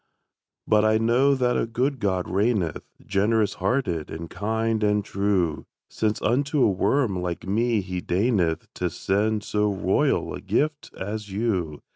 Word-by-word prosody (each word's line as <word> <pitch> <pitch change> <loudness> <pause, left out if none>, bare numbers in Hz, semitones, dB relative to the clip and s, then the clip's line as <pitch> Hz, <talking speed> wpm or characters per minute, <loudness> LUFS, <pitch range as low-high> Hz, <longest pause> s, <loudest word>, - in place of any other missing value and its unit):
But 105 0 +4
I 110 0 +4
know 120 +5 +3
that 125 -2 +1
a - - -1
good 130 +4 -1
God 95 -4 0
reigneth, 95 -3 0 0.2
Generous 105 +1 +1
hearted 90 - 0
and 80 +1 -7
kind 110 +1 -1
and 105 -1 +2
true; 95 -5 0 0.2
Since 110 -1 -1
unto 140 +3 +2
a 105 - +4
worm 100 0 +1
like 90 -1 -4
me 110 +3 +1
he 90 -1 -4
deigneth 90 -4 +1
To 90 - -2
send 105 +4 0
so 105 0 0
royal 95 - +1
a - - -6
gift 150 0 -1
as 105 +2 -5
you. 95 -7 -2
105 Hz, 150 wpm, -25 LUFS, 95-115 Hz, 0.2 s, But